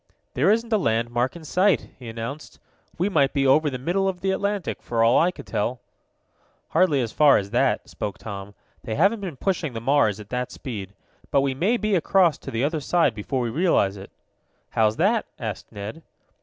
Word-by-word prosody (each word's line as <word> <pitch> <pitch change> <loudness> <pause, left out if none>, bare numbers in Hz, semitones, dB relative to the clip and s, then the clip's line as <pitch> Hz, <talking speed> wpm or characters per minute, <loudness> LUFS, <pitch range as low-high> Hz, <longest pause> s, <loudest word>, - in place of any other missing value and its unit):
"There 150 +9 +2
isn't 230 +2 +1
a 215 - +4
landmark 120 - 0
in 165 -2 -10
sight," 185 +5 +2
he 120 -3 -8
announced. 115 +6 -7 0.4
"We 180 +4 +1
might 145 -8 +2
be 140 -1 +1
over 150 +3 +4
the 130 - -4
middle 175 +9 0
of 180 -2 -6
the 190 0 +1
Atlantic, 200 -1 -2
for 115 -1 0
all 115 +2 +5
I 170 - +4
could 180 - -9
tell." 120 +4 -2 0.9
"Hardly 155 -7 +3
as 115 -3 -3
far 150 -2 +5
as 100 0 -3
that," - - +1
spoke 100 -2 -5
Tom. 100 -1 -8 0.3
"They 110 - -3
haven't 200 +8 +3
been 175 -8 -6
pushing 175 -7 -1
the 115 - -4
Mars 115 -4 +2
at 105 -1 -11
that 125 +1 -3
speed. 100 -6 -7 0.3
But 140 - +3
we 135 -1 0
may 195 - +1
be 215 -2 -1
across 175 -3 +3
to - - -8
the 115 +2 -1
other 155 +2 0
side 150 -2 +2
before 120 +5 -3
we 120 -2 -2
realize 145 - +2
it." 100 0 -10 0.6
"How's 110 -1 +2
that?" 210 +6 +2
asked 110 -7 -6
Ned. 105 +8 -7
140 Hz, 200 wpm, -24 LUFS, 115-180 Hz, 0.9 s, all